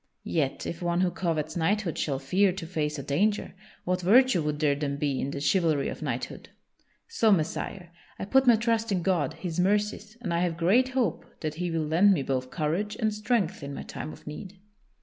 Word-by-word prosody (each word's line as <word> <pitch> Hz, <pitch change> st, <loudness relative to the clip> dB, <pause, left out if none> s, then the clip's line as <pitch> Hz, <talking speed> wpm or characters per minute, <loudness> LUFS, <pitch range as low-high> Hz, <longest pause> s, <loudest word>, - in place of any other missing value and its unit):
Yet 145 Hz, -5 st, -1 dB
if 170 Hz, -, -5 dB
one 175 Hz, 0 st, +1 dB
who 185 Hz, -1 st, +2 dB
covets 160 Hz, -4 st, -2 dB
knighthood 180 Hz, +1 st, 0 dB
shall 140 Hz, -3 st, -1 dB
fear 185 Hz, +9 st, +2 dB
to 185 Hz, -2 st, -6 dB
face 155 Hz, -3 st, -2 dB
a 140 Hz, -, -5 dB
danger, 195 Hz, +10 st, 0 dB, 0.3 s
what 180 Hz, 0 st, -1 dB
virtue 235 Hz, +1 st, +5 dB
would 150 Hz, -1 st, -1 dB
there 150 Hz, -2 st, +3 dB
then 140 Hz, -1 st, -2 dB
be 140 Hz, -2 st, -1 dB
in 135 Hz, -, -2 dB
the 140 Hz, -, -4 dB
chivalry 150 Hz, 0 st, +2 dB
of -, -, -7 dB
knighthood? -, -, -4 dB, 0.6 s
So, 230 Hz, -, +2 dB
Messire, 175 Hz, +1 st, -1 dB, 0.3 s
I -, -, -4 dB
put 265 Hz, +5 st, +3 dB
my 240 Hz, -, +8 dB
trust 225 Hz, 0 st, 0 dB
in 180 Hz, -3 st, 0 dB
God, 170 Hz, -8 st, +1 dB
His 175 Hz, -2 st, -4 dB
mercies, 210 Hz, +3 st, 0 dB
and 195 Hz, -8 st, -3 dB
I 170 Hz, -, +1 dB
have 175 Hz, -2 st, 0 dB
great 210 Hz, +10 st, +3 dB
hope 230 Hz, -10 st, 0 dB, 0.2 s
that 155 Hz, -1 st, -2 dB
He 175 Hz, +3 st, -3 dB
will 165 Hz, -2 st, -1 dB
lend 180 Hz, +7 st, +5 dB
me 140 Hz, -, 0 dB
both 130 Hz, -1 st, -2 dB
courage 175 Hz, +8 st, -1 dB
and 220 Hz, -2 st, 0 dB
strength 210 Hz, -5 st, 0 dB
in 140 Hz, 0 st, -6 dB
my -, -, -6 dB
time 155 Hz, -, -6 dB
of -, -, -14 dB
need." 185 Hz, +6 st, -8 dB
175 Hz, 210 wpm, -27 LUFS, 150-205 Hz, 0.6 s, my